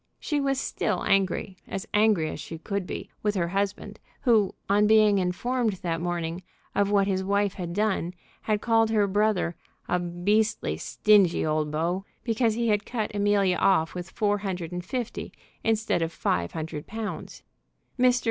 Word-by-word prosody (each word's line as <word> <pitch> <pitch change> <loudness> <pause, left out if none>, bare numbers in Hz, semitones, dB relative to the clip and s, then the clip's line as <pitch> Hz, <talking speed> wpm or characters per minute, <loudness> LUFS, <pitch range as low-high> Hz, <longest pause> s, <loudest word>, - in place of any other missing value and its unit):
She 295 -2 -1
was 275 -1 +1
still - - -1
angry, 190 -1 +1
as 195 - -5
angry 210 -7 +3
as - - -7
she 165 - -7
could 200 +2 -3
be, - - -6
with 210 -1 0
her 170 -3 0
husband, 200 +2 -2 0.2
who 220 -6 +3
on 205 +1 +4
being 215 -2 +5
informed 225 +6 0
that 170 -3 -3
morning 170 0 -2 0.3
of 200 0 +2
what 200 -1 +3
his 190 -1 0
wife 200 0 +1
had 175 -3 -5
done 195 -3 0 0.3
had 215 -1 0
called 225 -1 +3
her 215 -2 +3
brother 200 -3 +1 0.3
"a 180 - +1
beastly, 205 +6 0
stingy 205 -7 +3
old 155 -1 0
beau," 170 +5 -1 0.2
because 225 -1 +1
he 235 0 0
had 210 -1 +2
cut 220 -3 -3
Amelia 200 -3 +2
off 165 -4 +3
with 180 0 -6
four 205 0 0
hundred 185 -4 -4
and 180 0 -4
fifty 240 +5 -4 0.3
instead 225 -5 +1
of 165 0 -1
five 85 - -1
hundred 155 -2 -5
pounds. 210 - -6 0.6
Mr. 250 0 +5
200 Hz, 165 wpm, -26 LUFS, 175-215 Hz, 0.6 s, being